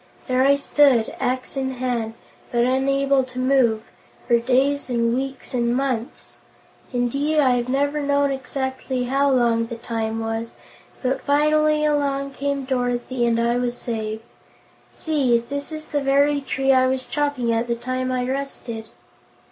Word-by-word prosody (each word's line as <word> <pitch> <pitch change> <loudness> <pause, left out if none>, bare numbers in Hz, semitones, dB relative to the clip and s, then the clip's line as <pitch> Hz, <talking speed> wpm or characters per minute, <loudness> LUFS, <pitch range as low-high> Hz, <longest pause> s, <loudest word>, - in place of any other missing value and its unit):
There 255 0 +2
I 280 +1 +5
stood, 280 -5 +3
axe 255 +2 -2
in 265 -1 -2
hand, 240 -3 -2 0.4
but 235 0 +2
unable 275 +1 +2
to 255 0 -12
move, 255 -4 +2 0.4
for 235 -1 +4
days 265 +4 +1
and 235 -1 +1
weeks 265 +1 -4
and 240 -1 +1
months! 255 -3 -3 0.5
Indeed, 275 +5 0
I 265 -3 +4
have 245 0 0
never 285 +3 0
known 285 0 +2
exactly 265 -1 -3
how 275 +3 +2
long 235 -3 +2
the 235 - -6
time 225 -1 -3
was; 225 +1 -4 0.5
but 260 +1 0
finally 305 +1 +3
along 280 -2 0
came 280 0 -2
Dorothy 245 -1 -1
and 230 0 +2
I 235 +1 +1
was 245 0 -1
saved. 220 -1 -4 0.7
See! 280 -7 +1
This 280 +6 -5
is 310 0 -7
the 290 -2 0
very 280 +1 +3
tree 270 0 0
I 260 -1 +4
was 260 0 -1
chopping 285 -6 -1
at 230 +1 0
the 235 - 0
time 255 +2 -3
I 250 -1 0
rusted." 250 -4 -4
255 Hz, 155 wpm, -22 LUFS, 240-275 Hz, 0.7 s, I